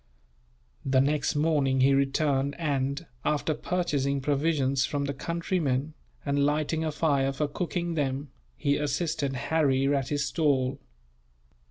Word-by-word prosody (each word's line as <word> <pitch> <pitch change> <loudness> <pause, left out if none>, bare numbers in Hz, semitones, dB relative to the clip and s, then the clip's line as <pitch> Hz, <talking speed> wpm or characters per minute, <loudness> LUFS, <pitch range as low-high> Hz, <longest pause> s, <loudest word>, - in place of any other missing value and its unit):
The 135 -1 +2
next 145 +3 +1
morning 145 -4 +2
he 135 +1 +5
returned 140 0 +1
and, 140 0 -1 0.2
after 150 +1 0
purchasing 145 -4 -1
provisions 140 -1 +1
from 140 +1 -1
the 140 - -2
countrymen, 155 -2 -1 0.3
and 140 0 +1
lighting 155 +2 0
a 155 - -1
fire 140 -3 +1
for 145 +2 -1
cooking 170 +2 -3
them, 140 -2 -2 0.3
he 145 -1 +1
assisted 150 -1 -1
Harry 135 0 +1
at 135 -1 -1
his 145 -1 0
stall. 140 -4 +1
145 Hz, 130 wpm, -28 LUFS, 135-155 Hz, 0.3 s, he